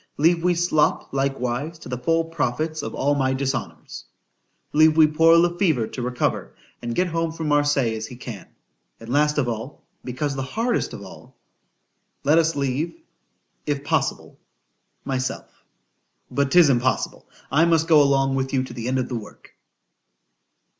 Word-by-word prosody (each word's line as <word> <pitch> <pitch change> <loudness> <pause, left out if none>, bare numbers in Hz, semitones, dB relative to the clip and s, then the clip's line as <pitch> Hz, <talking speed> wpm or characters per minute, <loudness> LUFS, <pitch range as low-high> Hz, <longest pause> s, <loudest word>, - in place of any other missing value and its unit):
—— - - -45
Leave 165 +3 +3
we 180 0 +2
Slop 170 -6 +1
likewise 135 +3 -2
to - - -12
the 125 - -3
full 165 +5 +1
profits 155 0 -2
of 110 - -6
all 145 +2 +1
my 130 -2 +1
dishonours.—— 135 0 -4 0.7
Leave 155 +1 +5
we 160 - +8
poor 165 +2 +5
Le 175 +1 +3
Fever 155 - +2
to 125 - -7
recover, 125 0 -2 0.3
and 120 0 -4
get 180 - +2
home 165 -1 -2
from 160 -1 -5
Marseilles 145 -6 +2
as 110 - -5
he 125 - -10
can.——And 115 0 -13
last 150 +3 +2
of 140 -4 +1
all,—because 125 +3 -5
the 135 - -3
hardest 225 - -1
of - - -8
all—— - - -13 0.9
Let 150 +4 +4
us 165 -1 +1
leave, 140 - -2 0.7
if 145 -1 -1
possible, - - -2 0.7
myself:——But 130 - -5
'tis 170 -2 +6
impossible,—I 130 +4 -1
must 165 -1 +2
go 155 -3 +6
along 135 -1 +2
with 135 0 -2
you 130 -1 +2
to 130 - -9
the 120 -1 -5
end 130 +1 0
of 130 - -1
the - - -7
work. 105 - -14
140 Hz, 155 wpm, -23 LUFS, 130-160 Hz, 0.9 s, we